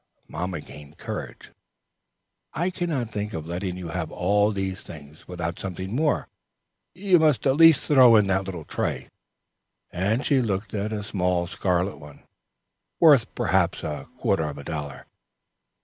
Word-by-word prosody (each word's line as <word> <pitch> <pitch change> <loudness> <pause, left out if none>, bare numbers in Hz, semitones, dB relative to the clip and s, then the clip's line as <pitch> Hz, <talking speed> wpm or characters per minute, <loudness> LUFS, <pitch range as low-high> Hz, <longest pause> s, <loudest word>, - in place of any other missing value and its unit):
Mamma 90 -2 -4
gained 75 +2 -13
courage. - - -7 1.0
"I 175 +3 0
can 175 -1 -3
not 125 -8 -2
think 105 0 -4
of 80 -1 -5
letting 90 +2 -4
you 90 -2 -6
have 85 -2 -4
all 105 +3 +2
these 95 -1 -3
things 75 -2 -13
without 85 -1 -4
something 95 +2 -5
more. 150 +2 +1 0.7
You 185 -1 +3
must 155 -4 +2
at 135 -1 +3
least 165 -2 +7
throw 130 -5 +6
in 105 -2 +5
that 95 0 0
little 90 -5 -6
tray," - - -3 0.8
and 105 +9 0
she 135 -2 +3
looked 100 -3 -3
at 105 +1 -2
a 105 -1 -3
small 90 -3 0
scarlet 90 +1 -1
one, 75 -2 -14 0.8
worth 145 -8 +6
perhaps - - +1
a 75 -1 -5
quarter 80 - +1
of 70 - -8
a 70 - -8
dollar. 70 -5 -6
95 Hz, 155 wpm, -25 LUFS, 85-120 Hz, 1.0 s, least